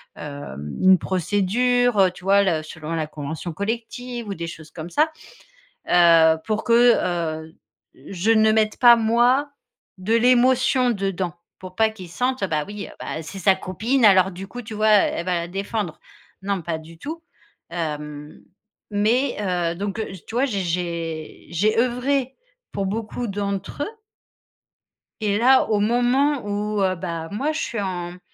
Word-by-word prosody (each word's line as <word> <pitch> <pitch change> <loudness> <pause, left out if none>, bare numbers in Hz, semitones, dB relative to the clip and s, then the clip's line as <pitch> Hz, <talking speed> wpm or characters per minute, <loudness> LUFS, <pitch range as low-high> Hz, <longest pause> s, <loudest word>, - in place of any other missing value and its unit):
hem 110 - -7
une 190 0 +7
procédure, 210 +6 +1
heu, 190 - +6
tu 180 - -15
vois, 200 +1 +4
le 160 -5 0
selon 160 +1 -7
la 160 -2 -1
convention 155 +3 -6
collective 235 +4 -4
ou 200 - -3
des 170 -2 -5
choses 155 -2 -10
comme 160 +1 -8
ça. 305 - +2 0.8
Heu, 165 -2 +6
pour 215 0 -1
que 235 - +1 0.7
heu, 160 +1 -15 0.5
je 195 +3 -1
ne 220 -1 +5
mette 215 -1 +1
pas 240 -1 +8
moi 240 +5 +2 0.5
de 195 +5 -2
l'émotion 255 +1 +4
dedans, 195 -4 -2 0.3
pour 185 0 -10
pas 220 +2 +3
qu'ils 190 -6 -10
sentent 250 +4 -1
heu: - - +2
«Bah 150 -1 -1
oui, 205 0 -7
heu, - - -13
bah 160 - -5
c'est 160 +5 -8
sa 190 +1 +4
copine. 220 +7 -1
Alors 190 -2 +6
du 190 +2 -8
coup, 245 +5 -8
tu 220 -1 -8
vois, 215 +1 +1
elle 205 -4 +3
va 185 - 0
la 170 - -5
défendre.» 195 -2 -4 0.4
Non, 195 -1 -1
pas 165 0 -3
du 160 +1 -14
tout. 325 - -7 0.5
Hem, 150 -3 -5 0.5
mais, 230 +6 +1
heu, 175 -4 -1
donc, 200 +3 -4
heu, 220 - -3 0.2
tu - - -9
vois, 250 +3 +2
j'ai 210 -8 -1
j'ai 170 -2 -4
j'ai 210 +7 +1
œuvré 255 +2 0 0.4
pour 200 - -2
beaucoup 225 +4 -3
d'entre 200 +6 -3
eux. - - -5 1.3
Et 205 -1 +1
là, 260 +3 +5
au 210 -2 +1
moment 245 +5 +2
où, 205 0 -2
heu, 185 -1 +1
bah, 170 -2 -5
moi 270 +10 -1
je 315 - -3
suis 230 -8 -3
en, 175 -3 -4
mmh, 180 - -13
200 Hz, 170 wpm, -22 LUFS, 170-235 Hz, 1.3 s, pas